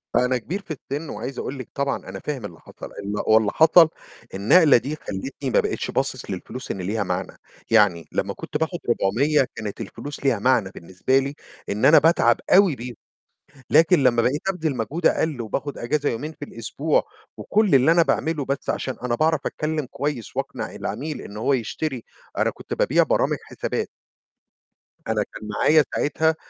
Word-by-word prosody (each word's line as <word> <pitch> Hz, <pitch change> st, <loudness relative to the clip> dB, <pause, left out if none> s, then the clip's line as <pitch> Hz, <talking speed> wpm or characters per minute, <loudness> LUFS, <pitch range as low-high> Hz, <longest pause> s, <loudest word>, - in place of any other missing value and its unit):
أنا 125 Hz, 0 st, +3 dB
كبير 175 Hz, -, -5 dB
في 175 Hz, -, -11 dB, 0.2 s
السِن، 145 Hz, +2 st, -3 dB
وعايز 135 Hz, -, -5 dB
أقول 135 Hz, +1 st, -5 dB
لِك 130 Hz, -, -8 dB
طبعًا 140 Hz, 0 st, -1 dB
أنا 95 Hz, +1 st, -7 dB
فاهم 135 Hz, -4 st, -4 dB
اللي 85 Hz, -5 st, -9 dB
حصل، -, -, -11 dB
ال 100 Hz, +1 st, -6 dB
هو 110 Hz, -, +6 dB
اللي 105 Hz, -2 st, +1 dB
حصل 160 Hz, 0 st, +6 dB, 0.4 s
النقلة 145 Hz, -, +5 dB
دي 140 Hz, +5 st, -3 dB
خلّتني 135 Hz, +2 st, -5 dB
ما -, -, +3 dB
بقِتش -, -, -2 dB
باصص -, -, -2 dB
للفلوس 110 Hz, +7 st, -6 dB
إن -, -, -4 dB
ليها 105 Hz, +5 st, -1 dB
معنى، -, -, -4 dB, 0.3 s
يعني 100 Hz, -7 st, +4 dB
لمّا -, -, -1 dB
كنت -, -, -5 dB
باخد 160 Hz, +3 st, -2 dB
400 130 Hz, +7 st, +2 dB
كانت 110 Hz, 0 st, -6 dB
الفلوس 140 Hz, +7 st, -8 dB
ليها 125 Hz, -6 st, +3 dB
معنى 120 Hz, -3 st, +2 dB
بالنسبة 95 Hz, +10 st, 0 dB
لي، 140 Hz, +2 st, -4 dB, 0.3 s
إن 105 Hz, +2 st, 0 dB
أنا 155 Hz, -, +8 dB
باتعب 155 Hz, -8 st, +4 dB
أوي 190 Hz, -5 st, +6 dB
بيهم، 120 Hz, -1 st, -7 dB, 0.8 s
لكن 160 Hz, 0 st, +5 dB
لمّا 120 Hz, -2 st, +4 dB
بقيت 145 Hz, +10 st, 0 dB
أبذل 160 Hz, -7 st, -1 dB
مجهود 155 Hz, +9 st, -2 dB
أقل 155 Hz, -6 st, +1 dB
وباخد 135 Hz, +5 st, -4 dB
أجازة 145 Hz, +5 st, 0 dB
يومين 145 Hz, +7 st, -4 dB
في 145 Hz, -, -8 dB
الأسبوع، 145 Hz, +4 st, -1 dB, 0.3 s
وكُلّ 210 Hz, -6 st, +2 dB
اللي 135 Hz, +4 st, +6 dB
أنا 170 Hz, 0 st, +5 dB
باعمله 160 Hz, -2 st, 0 dB
بس 140 Hz, +1 st, -2 dB
عشان 130 Hz, -, -3 dB
أنا 125 Hz, -1 st, 0 dB
باعرف 155 Hz, +3 st, +2 dB
أتكلم 155 Hz, -2 st, -2 dB
كويس 140 Hz, -7 st, -4 dB
وأقنع -, -, -4 dB
العميل 145 Hz, +8 st, -4 dB
إن 100 Hz, -, -10 dB
هو 130 Hz, +6 st, +1 dB
يشتري 130 Hz, +1 st, -2 dB, 0.3 s
أنا -, -, +2 dB
كنت -, -, -7 dB
بابيع -, -, +3 dB
برامج -, -, +1 dB
حسابات. -, -, -4 dB, 1.2 s
أنا -, -, +1 dB
كان 105 Hz, -, -8 dB
معايا 150 Hz, +9 st, +4 dB
ساعتها 160 Hz, +2 st, +1 dB
135 Hz, 175 wpm, -23 LUFS, 115-155 Hz, 1.2 s, أنا